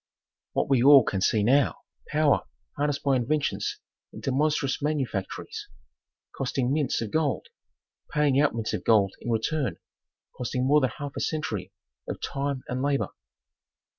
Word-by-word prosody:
What -, -, +1 dB
we 135 Hz, -3 st, +3 dB
all 140 Hz, 0 st, +8 dB
can 95 Hz, -3 st, -2 dB
see 105 Hz, +1 st, +2 dB
now, 135 Hz, +6 st, +3 dB, 0.3 s
power 150 Hz, -1 st, +2 dB, 0.3 s
harnessed 145 Hz, 0 st, -1 dB
by 140 Hz, -2 st, +3 dB
inventions 140 Hz, +4 st, -1 dB, 0.3 s
into 135 Hz, -, -4 dB
monstrous 145 Hz, 0 st, +1 dB
manufactories, 150 Hz, -, -3 dB, 0.7 s
costing 130 Hz, -1 st, -1 dB
mints 145 Hz, -6 st, 0 dB
of 110 Hz, -3 st, -4 dB
gold, 160 Hz, -, 0 dB, 0.6 s
paying 145 Hz, -2 st, +3 dB
out 150 Hz, -5 st, +3 dB
mints 115 Hz, -1 st, -2 dB
of -, -, -3 dB
gold 100 Hz, -4 st, +4 dB
in -, -, -5 dB
return, 125 Hz, +5 st, 0 dB, 0.6 s
costing 125 Hz, +1 st, -2 dB
more 150 Hz, +3 st, +5 dB
than 130 Hz, -, +2 dB
half 145 Hz, -1 st, -6 dB
a -, -, -3 dB
century 155 Hz, -1 st, -2 dB, 0.4 s
of -, -, -4 dB
time 140 Hz, -1 st, -3 dB
and 125 Hz, +1 st, -2 dB
labor. 140 Hz, 0 st, +1 dB
140 Hz, 145 wpm, -27 LUFS, 125-150 Hz, 0.7 s, all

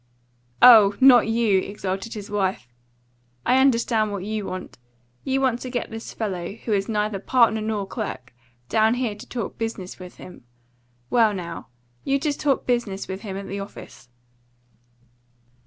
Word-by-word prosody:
"Oh, 215 Hz, -5 st, +9 dB
not 255 Hz, -4 st, +7 dB
you!" 225 Hz, -4 st, +2 dB
exulted 195 Hz, +3 st, -4 dB
his 205 Hz, -1 st, -8 dB
wife. 190 Hz, -10 st, -1 dB, 0.8 s
"I 255 Hz, +2 st, +4 dB
understand 230 Hz, -4 st, +2 dB
what 200 Hz, -2 st, -4 dB
you 215 Hz, -1 st, -3 dB
want. 185 Hz, -8 st, -7 dB, 0.4 s
You 270 Hz, 0 st, 0 dB
want 255 Hz, -3 st, +1 dB
to 255 Hz, -, -6 dB
get 245 Hz, -1 st, -3 dB
this 225 Hz, 0 st, -7 dB
fellow, 190 Hz, -4 st, -4 dB
who 225 Hz, 0 st, -4 dB
is 195 Hz, 0 st, 0 dB
neither 210 Hz, -2 st, -1 dB
partner 225 Hz, 0 st, +3 dB
nor 215 Hz, -2 st, -2 dB
clerk, 190 Hz, -, -6 dB, 0.3 s
down 220 Hz, -, +3 dB
here 245 Hz, -4 st, -1 dB
to 205 Hz, -, -13 dB
talk 235 Hz, -5 st, -5 dB
business 220 Hz, -6 st, -5 dB
with 180 Hz, 0 st, -10 dB
him. 180 Hz, -, -13 dB, 0.7 s
Well, 225 Hz, -4 st, +4 dB
now, 170 Hz, -6 st, -7 dB, 0.4 s
you 275 Hz, 0 st, +1 dB
just 290 Hz, 0 st, -2 dB
talk 280 Hz, -2 st, +1 dB
business 235 Hz, -6 st, -1 dB
with 190 Hz, +1 st, -6 dB
him 195 Hz, -3 st, -6 dB
at 200 Hz, 0 st, -7 dB
the 200 Hz, +1 st, -5 dB
office." 195 Hz, -10 st, -10 dB
215 Hz, 155 wpm, -23 LUFS, 195-235 Hz, 0.8 s, Oh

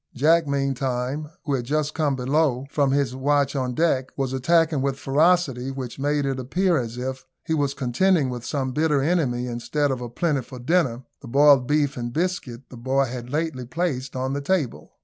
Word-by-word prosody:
Jack 160 Hz, +4 st, +3 dB
meantime, 135 Hz, +1 st, -1 dB, 0.2 s
who 145 Hz, -, -1 dB
had 130 Hz, -3 st, 0 dB
just 150 Hz, +4 st, -1 dB
come 150 Hz, -4 st, 0 dB
below 135 Hz, 0 st, +1 dB
from 140 Hz, -2 st, +2 dB
his 135 Hz, -2 st, +1 dB
watch 140 Hz, +1 st, +1 dB
on 130 Hz, -2 st, -1 dB
deck, 135 Hz, -5 st, +1 dB
was 135 Hz, -2 st, -1 dB
attacking, 160 Hz, +2 st, +2 dB
with 135 Hz, 0 st, 0 dB
a -, -, -21 dB
ferocity 140 Hz, -2 st, +2 dB
which 130 Hz, -2 st, -6 dB
made 145 Hz, +1 st, 0 dB
it 135 Hz, -1 st, -1 dB
appear 175 Hz, +8 st, +1 dB
as 120 Hz, -1 st, -5 dB
if 130 Hz, +1 st, -4 dB, 0.2 s
he 160 Hz, -, -1 dB
was 140 Hz, -3 st, 0 dB
contending 135 Hz, +3 st, +2 dB
with 120 Hz, -2 st, -6 dB
some 130 Hz, -1 st, -2 dB
bitter 150 Hz, -1 st, +1 dB
enemy, 140 Hz, -7 st, +1 dB
instead 130 Hz, +4 st, -1 dB
of 130 Hz, -2 st, -3 dB
a 120 Hz, -, -5 dB
plentiful 135 Hz, -2 st, -2 dB
dinner, 130 Hz, -2 st, +1 dB, 0.2 s
the 135 Hz, -, -10 dB
boiled 140 Hz, 0 st, +5 dB
beef 145 Hz, -2 st, +1 dB
and 120 Hz, -1 st, -4 dB
biscuit 160 Hz, -8 st, -2 dB
the 125 Hz, -, -9 dB
boy 135 Hz, +3 st, +1 dB
had 120 Hz, -1 st, -6 dB
lately 150 Hz, -2 st, -2 dB
placed 135 Hz, -1 st, -3 dB
on 130 Hz, +1 st, -2 dB
the 140 Hz, -, -2 dB
table. 150 Hz, -4 st, -1 dB
135 Hz, 190 wpm, -24 LUFS, 125-150 Hz, 0.2 s, boiled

